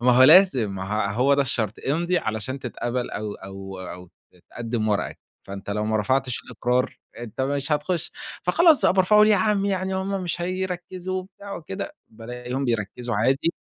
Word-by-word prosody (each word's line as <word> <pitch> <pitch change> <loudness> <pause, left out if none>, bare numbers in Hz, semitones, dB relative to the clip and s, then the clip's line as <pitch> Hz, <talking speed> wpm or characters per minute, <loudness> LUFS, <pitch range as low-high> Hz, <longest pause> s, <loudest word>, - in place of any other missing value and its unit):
ما 125 +1 +4
هو 125 +1 +6
لازم 135 - +6
ما 95 - -5
ه 100 +1 -1
هو 130 +6 +3
ده 140 - +3
الشرط، 115 -5 -1 0.2
امضِ 170 +4 0
علشان 120 - -1
تتقبل 120 0 -3
أو 105 -1 -4
أو 95 0 -9
أو 90 0 -8
ت - - -30
تقدّم 115 -2 -2
ورقك، 105 - -1 0.3
فأنت 100 0 -7
لو 105 +1 -1
ما 110 0 +1
رفعتش 130 +4 0
الإقرار 125 +1 -1 0.2
أنت 120 +1 -7
مش 140 +2 -1
هتخش، 150 +3 -1 0.3
فخلاص 315 - +5
بقى - - +5
أبقى 190 - -1
أرفعه 210 +3 +6
ليه 215 - +6
يا 210 - +6
عمّي؟ 200 -2 +2
يعني 190 0 -1
هُم 195 0 -2
مش 175 -1 -3
هيركزوا 185 0 -3
وبتاع 200 +1 -9
وكده، 195 - -6
بالاقيهم 125 +4 -5
بيركزوا 120 0 -2
عادي. 135 +10 +2
130 Hz, 180 wpm, -24 LUFS, 110-185 Hz, 0.3 s, هو